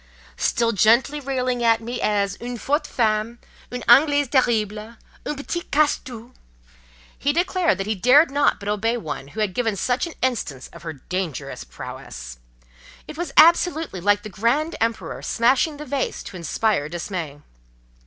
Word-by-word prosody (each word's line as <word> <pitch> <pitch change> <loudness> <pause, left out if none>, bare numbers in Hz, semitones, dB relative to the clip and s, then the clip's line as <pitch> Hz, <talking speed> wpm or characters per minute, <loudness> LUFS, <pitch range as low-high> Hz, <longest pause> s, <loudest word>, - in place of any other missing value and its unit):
Still 235 -1 +1
gently 235 +8 +3
railing 255 -3 -2
at 225 -1 +4
me 235 +2 -5
as 200 -1 +1
"une 245 0 -5
forte 290 +7 -1
femme—une 230 +2 -3
Anglaise 285 +3 +5
terrible—une 225 +2 -1
petite 345 +5 -5
casse 295 0 +3
tout"—he - - -8
declared 350 +1 +1
that 195 - -3
he 215 - 0
dared 255 - +5
not 285 0 +2
but 200 - -8
obey 220 +3 0
one 145 - -6
who 215 +10 -5
had 205 -3 0
given 225 -2 0
such 245 - 0
an 335 - -9
instance 205 - -2
of - - -13
her 165 -1 -6
dangerous 150 -2 -5
prowess; - - -9 0.7
it - - -8
was 340 -2 -4
absolutely 325 - +4
like 205 +2 +2
the 215 - -7
"grand 255 - 0
Empereur 230 0 -2
smashing 260 +6 +2
the 300 - -7
vase 280 -2 -2
to - - -10
inspire 175 -1 0
dismay." 170 -3 -5
230 Hz, 150 wpm, -22 LUFS, 195-275 Hz, 0.7 s, Anglaise